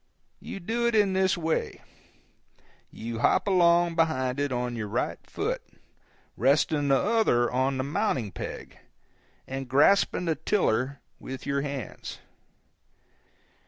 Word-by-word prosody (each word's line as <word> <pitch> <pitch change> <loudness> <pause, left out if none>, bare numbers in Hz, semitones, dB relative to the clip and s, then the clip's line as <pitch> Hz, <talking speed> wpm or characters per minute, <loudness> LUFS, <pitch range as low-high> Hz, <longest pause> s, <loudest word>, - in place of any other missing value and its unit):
You - - -7
do 235 +6 -1
it 235 - +1
in 205 -3 +3
this 190 -1 +2
way: 165 -1 -2 1.1
you 115 0 -6
hop 185 - +3
along 175 -2 +4
behind 130 -6 +1
it 145 -1 0
on 125 -1 -2
your 110 -2 -4
right - - -2
foot, - - -2 0.7
resting 145 +1 +2
the 135 -1 +4
other 205 - +2
on 130 +2 0
the 130 - -1
mounting 140 - -1
peg, - - -8 0.7
and 135 -1 -6
grasping 175 +7 +3
the 165 - +2
tiller 140 - 0 0.2
with 130 0 -7
your 140 0 0
hands. 140 -6 -6
140 Hz, 125 wpm, -27 LUFS, 130-180 Hz, 1.1 s, along